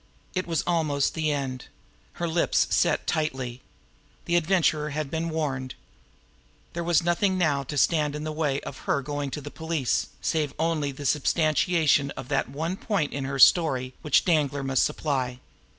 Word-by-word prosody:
It 185 Hz, -1 st, -2 dB
was 165 Hz, -3 st, 0 dB
almost 155 Hz, -5 st, +1 dB
the 155 Hz, -1 st, 0 dB
end. 135 Hz, -3 st, -3 dB, 0.5 s
Her 170 Hz, -, -3 dB
lips 165 Hz, +1 st, +2 dB
set -, -, +2 dB
tightly. 130 Hz, -5 st, -2 dB, 0.6 s
The 170 Hz, -, 0 dB
Adventurer 160 Hz, -3 st, +2 dB
had 150 Hz, -1 st, -4 dB
been 165 Hz, +1 st, -2 dB
warned. 135 Hz, -5 st, -3 dB, 1.0 s
There 170 Hz, -, -3 dB
was 170 Hz, 0 st, +2 dB
nothing 185 Hz, +3 st, +1 dB
now 150 Hz, -6 st, +2 dB
to 145 Hz, +3 st, -5 dB
stand 150 Hz, 0 st, +2 dB
in 150 Hz, -, -5 dB
the 155 Hz, -, -3 dB
way 150 Hz, -3 st, -1 dB
of -, -, -8 dB
her 140 Hz, -, +1 dB
going 145 Hz, 0 st, -3 dB
to 140 Hz, +3 st, -5 dB
the 145 Hz, +1 st, -8 dB
police, 160 Hz, -5 st, -1 dB
save 150 Hz, -4 st, -1 dB
only 155 Hz, -3 st, 0 dB
the 140 Hz, +1 st, -8 dB
substantiation 155 Hz, 0 st, +2 dB
of 125 Hz, -, -7 dB
that 135 Hz, -3 st, 0 dB
one 160 Hz, +7 st, -3 dB
point 195 Hz, -11 st, -1 dB
in 140 Hz, -1 st, -3 dB
her 135 Hz, -, -4 dB
own 135 Hz, -, -3 dB
story 130 Hz, -7 st, +5 dB
which 150 Hz, -, +3 dB
Danglar 145 Hz, -5 st, +1 dB
must 135 Hz, -1 st, +1 dB
supply. 130 Hz, -4 st, -1 dB
150 Hz, 170 wpm, -26 LUFS, 140-165 Hz, 1.0 s, story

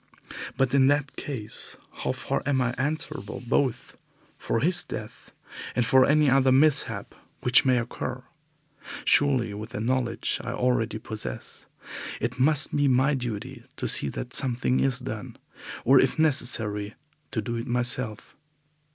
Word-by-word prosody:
But 135 Hz, -1 st, +1 dB
in 135 Hz, -1 st, +5 dB
that 145 Hz, 0 st, +1 dB
case, 115 Hz, -7 st, -5 dB, 0.2 s
how -, -, -2 dB
far -, -, -3 dB
am 140 Hz, -2 st, +2 dB
I 125 Hz, -1 st, 0 dB
answerable 145 Hz, -4 st, -3 dB
both 125 Hz, 0 st, -1 dB, 0.4 s
for 115 Hz, -, -1 dB
his 175 Hz, +3 st, +3 dB
death 110 Hz, -1 st, -9 dB, 0.4 s
and 125 Hz, -, +1 dB
for 130 Hz, +2 st, +5 dB
any 150 Hz, +1 st, +4 dB
other 135 Hz, 0 st, +4 dB
mishap 145 Hz, +2 st, +2 dB, 0.3 s
which 125 Hz, +2 st, +4 dB
may 130 Hz, -1 st, +3 dB
occur? 120 Hz, +1 st, -4 dB, 0.8 s
Surely 130 Hz, -7 st, +3 dB
with 105 Hz, +2 st, -7 dB
the -, -, -4 dB
knowledge 120 Hz, 0 st, -1 dB
I -, -, -4 dB
already 120 Hz, -3 st, 0 dB
possess 110 Hz, -1 st, -8 dB, 0.5 s
it 125 Hz, +3 st, -3 dB
must 150 Hz, +2 st, +4 dB
be 145 Hz, -1 st, +2 dB
my 130 Hz, +3 st, +3 dB
duty 120 Hz, -6 st, -5 dB
to -, -, -3 dB
see 70 Hz, -, +4 dB
that 125 Hz, -, -6 dB
something 125 Hz, 0 st, 0 dB
is 135 Hz, -2 st, +1 dB
done, 115 Hz, -5 st, -7 dB, 0.5 s
or 135 Hz, +2 st, +6 dB
if 135 Hz, -, 0 dB
necessary 110 Hz, -9 st, +1 dB, 0.3 s
to -, -, -3 dB
do 115 Hz, +2 st, -3 dB
it 115 Hz, +3 st, -5 dB
myself. 120 Hz, -2 st, +1 dB
125 Hz, 145 wpm, -26 LUFS, 115-135 Hz, 0.8 s, or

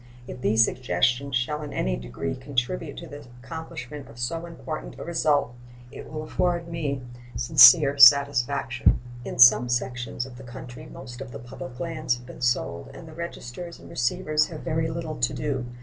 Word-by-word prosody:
If 125 Hz, -, -8 dB
these 110 Hz, -1 st, +4 dB
suggestions 125 Hz, +1 st, 0 dB
shall 150 Hz, +5 st, -1 dB
in 150 Hz, -1 st, -7 dB
any 60 Hz, 0 st, -1 dB
degree -, -, -5 dB
contribute 140 Hz, +4 st, -3 dB
to -, -, -8 dB
the 145 Hz, -1 st, -11 dB, 0.2 s
accomplishment 150 Hz, -2 st, -8 dB
of 115 Hz, -, -14 dB
so 165 Hz, +8 st, -3 dB
important 160 Hz, -2 st, -7 dB
a -, -, -7 dB
result, 150 Hz, -6 st, +1 dB, 0.4 s
it -, -, -10 dB
will 155 Hz, 0 st, -5 dB
afford 170 Hz, +1 st, -1 dB
me 145 Hz, -6 st, -3 dB, 0.3 s
sincere 140 Hz, +3 st, +7 dB
satisfaction. 140 Hz, -2 st, +5 dB, 0.2 s
In -, -, -6 dB
some 125 Hz, 0 st, +7 dB
sections 125 Hz, 0 st, -2 dB
of 130 Hz, -2 st, -12 dB
the 135 Hz, -, -11 dB
country 120 Hz, 0 st, -10 dB
most 125 Hz, -1 st, -10 dB
of 135 Hz, -2 st, -8 dB
the 110 Hz, -, -7 dB
public 120 Hz, +1 st, -10 dB
lands 155 Hz, -7 st, -2 dB
have 120 Hz, -, -14 dB
been 125 Hz, -, -12 dB
sold, 120 Hz, 0 st, -1 dB
and 165 Hz, -, -11 dB
the 160 Hz, -, -11 dB
registers 170 Hz, 0 st, -7 dB
and -, -, -14 dB
receivers 150 Hz, +5 st, 0 dB
have 155 Hz, -3 st, -8 dB
very 160 Hz, -1 st, -1 dB
little 160 Hz, -1 st, -5 dB
to 120 Hz, -, 0 dB
do. 135 Hz, -5 st, -3 dB
135 Hz, 175 wpm, -25 LUFS, 120-155 Hz, 0.4 s, sincere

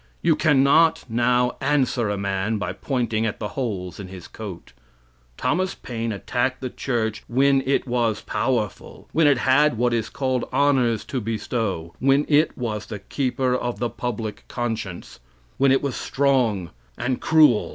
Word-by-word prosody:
You 165 Hz, -2 st, +4 dB
can 145 Hz, -4 st, +3 dB
not 160 Hz, +4 st, +4 dB
now 125 Hz, +2 st, +2 dB
answer 135 Hz, -5 st, +1 dB
a 105 Hz, -, -1 dB
man 100 Hz, +2 st, -1 dB
by 100 Hz, -, -3 dB
pointing 120 Hz, -5 st, -1 dB
at 105 Hz, -, -3 dB
the 105 Hz, -, -3 dB
holes 100 Hz, -10 st, -4 dB
in 100 Hz, -, -6 dB
his 90 Hz, -2 st, -10 dB
coat. 100 Hz, -, -9 dB, 0.6 s
Thomas 185 Hz, +4 st, 0 dB
Paine 115 Hz, -2 st, -4 dB
attacked 125 Hz, +5 st, -1 dB
the 130 Hz, -2 st, -5 dB
church 110 Hz, -4 st, -2 dB
when 135 Hz, +2 st, +3 dB
it 140 Hz, -, +2 dB
was 120 Hz, -3 st, 0 dB
powerful; 115 Hz, -6 st, -3 dB
when 160 Hz, -1 st, +4 dB
it 140 Hz, -3 st, +4 dB
had 135 Hz, +1 st, +3 dB
what 120 Hz, +1 st, +2 dB
is 115 Hz, -2 st, -1 dB
called 130 Hz, -2 st, -2 dB
honors 130 Hz, -6 st, +2 dB
to 130 Hz, -, -3 dB
bestow; 105 Hz, -6 st, -3 dB
when 135 Hz, +2 st, +3 dB
it 150 Hz, +1 st, +3 dB
was 110 Hz, -4 st, -3 dB
the 105 Hz, -, -5 dB
keeper 130 Hz, +4 st, -1 dB
of 120 Hz, -3 st, -2 dB
the 120 Hz, +2 st, -2 dB
public 110 Hz, -3 st, -4 dB
conscience; 110 Hz, -, -4 dB, 0.4 s
when 135 Hz, 0 st, +5 dB
it 135 Hz, -, +3 dB
was 140 Hz, -5 st, -2 dB
strong 125 Hz, -, +1 dB, 0.3 s
and 125 Hz, +1 st, -2 dB
cruel. 155 Hz, -8 st, +4 dB
120 Hz, 160 wpm, -23 LUFS, 110-135 Hz, 0.6 s, when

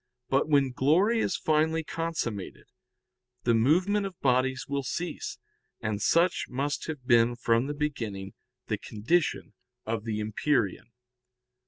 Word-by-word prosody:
But 135 Hz, +3 st, +2 dB
when 140 Hz, -3 st, +3 dB
glory 175 Hz, -, +3 dB
is 185 Hz, -, 0 dB
finally 160 Hz, +1 st, +1 dB
consummated, 155 Hz, -, -4 dB, 0.8 s
the 120 Hz, -, +3 dB
movement 180 Hz, -, +3 dB
of 185 Hz, -3 st, -12 dB
bodies 130 Hz, 0 st, +1 dB
will 140 Hz, 0 st, -1 dB
cease. 175 Hz, +6 st, -4 dB, 0.4 s
And 105 Hz, -1 st, -2 dB
such 170 Hz, -, +2 dB
must 140 Hz, +3 st, -2 dB
have 150 Hz, -5 st, -6 dB
been 120 Hz, -1 st, +4 dB
from 115 Hz, +1 st, +1 dB
the 145 Hz, -, -3 dB
beginning 115 Hz, -10 st, -3 dB, 0.3 s
the 110 Hz, -2 st, -2 dB
condition 145 Hz, +13 st, -1 dB, 0.3 s
of 110 Hz, -1 st, -2 dB
the 110 Hz, -2 st, -2 dB
empyrean. 110 Hz, +1 st, -1 dB
135 Hz, 130 wpm, -28 LUFS, 115-160 Hz, 0.8 s, been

